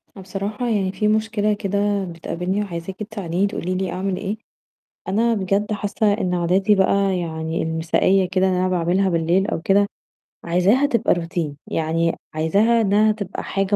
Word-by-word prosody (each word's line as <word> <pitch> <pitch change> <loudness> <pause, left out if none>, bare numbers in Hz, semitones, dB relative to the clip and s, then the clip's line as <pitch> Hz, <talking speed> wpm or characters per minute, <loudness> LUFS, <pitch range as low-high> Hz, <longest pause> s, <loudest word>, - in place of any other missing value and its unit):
أنا 195 - -10
بصراحة 200 +5 -4
يعني 195 -4 +1
في 210 +2 -1
مشكلة 215 -1 +1
كده 200 0 0
بتقابلني 180 +3 -3
وعايزاكِ 180 -1 -6
تساعديني 200 -3 -2
تقولي 185 -2 -3
لي 190 0 -2
أعمل 190 0 -2
إيه، 205 +2 -3 0.7
أنا 225 +5 +2
بجد 200 0 0
حاسّة 205 +1 0
إن 185 -4 -1
عاداتي 185 +4 +2
بقى 195 0 +2
يعني 160 -1 -3
المسائيّة 165 +4 +2
كده 190 0 +2
اللي 185 -1 +1
أنا 185 - +1
باعملها 180 +2 +1
بالليل 170 +3 +1
أو 220 - -2
كده، 200 +3 +3 0.6
عايزاها 185 +11 +3
تبقى 235 -4 +2
Routine، 165 -3 -3
يعني 165 +1 0 0.2
عايزاها 200 +9 +3
إنّها 215 +1 +3
تبقى 210 -3 -5
حاجة 195 +1 0
195 Hz, 155 wpm, -21 LUFS, 175-205 Hz, 0.7 s, كده